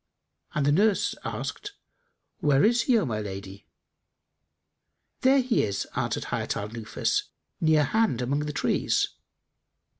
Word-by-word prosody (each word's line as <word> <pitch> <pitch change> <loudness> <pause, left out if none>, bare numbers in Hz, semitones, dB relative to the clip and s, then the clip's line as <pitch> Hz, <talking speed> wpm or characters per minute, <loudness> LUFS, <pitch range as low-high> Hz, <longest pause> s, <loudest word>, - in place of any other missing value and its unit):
and 150 - +1
the 145 - +4
nurse 200 +6 +3
asked, 415 -1 -5 0.7
"Where 145 -1 +4
is 235 +2 +4
he, 245 - +6
O 210 - +1
my 110 -5 -2
lady?" 100 0 -8 1.5
"There 265 +1 +5
he 255 -2 +1
is," 100 -1 -1
answered - - -1
Hayat - - -1
al 100 +1 -4
Nufus; 115 -1 -1 0.3
"near 155 -2 +4
hand, 215 - +1
among 130 +4 0
the - - -2
trees." - - +1
145 Hz, 130 wpm, -27 LUFS, -, 1.5 s, he